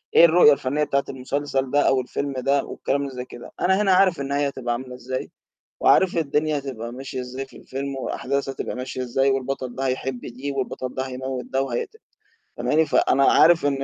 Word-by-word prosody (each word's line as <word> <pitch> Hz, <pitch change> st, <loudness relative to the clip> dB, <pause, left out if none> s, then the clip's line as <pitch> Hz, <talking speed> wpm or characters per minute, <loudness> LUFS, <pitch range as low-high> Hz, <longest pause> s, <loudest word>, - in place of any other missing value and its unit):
إيه -, -, +9 dB
الرؤية 165 Hz, -3 st, +7 dB
الفنيّة 140 Hz, +2 st, -1 dB
بتاعة 140 Hz, -1 st, +1 dB
المسلسل 135 Hz, 0 st, -2 dB
ده 145 Hz, -, +3 dB
أو 135 Hz, -1 st, +3 dB
الفيلم 140 Hz, +3 st, -4 dB
ده 140 Hz, +2 st, +1 dB
والكلام 140 Hz, 0 st, -2 dB
زي 125 Hz, -1 st, -6 dB
كده. 120 Hz, -, -11 dB
أنا 190 Hz, +3 st, +3 dB
هنا 195 Hz, -2 st, +4 dB
عارف 185 Hz, -5 st, +4 dB
النهاية 140 Hz, +1 st, 0 dB
هتبقى 125 Hz, -3 st, -3 dB
عاملة 125 Hz, +1 st, -6 dB
إزاي 130 Hz, +1 st, -5 dB, 0.5 s
وعارف 190 Hz, -2 st, +4 dB
الدنيا 150 Hz, 0 st, +1 dB
هتبقى 120 Hz, -4 st, -6 dB
ماشية 130 Hz, +1 st, -6 dB
إزاي 130 Hz, +2 st, -6 dB
في -, -, -17 dB
الفيلم 135 Hz, +1 st, -5 dB
وأحداث 140 Hz, +1 st, -2 dB
هتبقى 135 Hz, -, -4 dB
ماشية 130 Hz, 0 st, -4 dB
إزاي 135 Hz, +2 st, +1 dB
والبطل 135 Hz, -1 st, -2 dB
ده 135 Hz, 0 st, -2 dB
هيحب 130 Hz, -1 st, -2 dB
دي 130 Hz, +4 st, -6 dB
والبطل 130 Hz, -1 st, -4 dB
ده 130 Hz, -, -1 dB
هيموِّت 130 Hz, 0 st, -4 dB
ده 135 Hz, 0 st, -1 dB
وهيقت 135 Hz, -, -4 dB, 0.6 s
فهماني؟ 160 Hz, +1 st, +2 dB
فأنا 140 Hz, -2 st, +3 dB
عارف 170 Hz, -2 st, +5 dB
إن 135 Hz, -1 st, 0 dB
135 Hz, 185 wpm, -23 LUFS, 130-145 Hz, 0.6 s, إيه